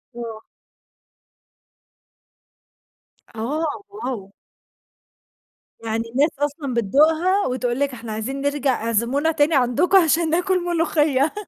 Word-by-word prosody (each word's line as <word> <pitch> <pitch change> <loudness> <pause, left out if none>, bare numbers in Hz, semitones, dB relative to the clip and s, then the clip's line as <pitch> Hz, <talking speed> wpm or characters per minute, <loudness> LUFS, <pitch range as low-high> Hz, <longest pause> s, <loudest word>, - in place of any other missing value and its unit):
آه. 225 -2 -7 2.9
آه، 295 - -3
واو! 250 - -6 1.5
يعني 225 0 -2
الناس 280 +6 +2
أصلًا 290 -2 -2
بتدوقها 315 - +2
وتقول 250 0 -2
لِك 280 -2 0
إحنا 230 -2 -8
عايزين 255 +6 -4
نرجَع 285 -4 0
اعزمونا 235 +8 +1
تاني 305 0 +2
عَندكم 275 +9 +3
عشان 330 -2 +3
ناكل 360 +2 +1
ملوخية. 310 -4 +1
280 Hz, 95 wpm, -22 LUFS, 240-320 Hz, 2.9 s, عَندكم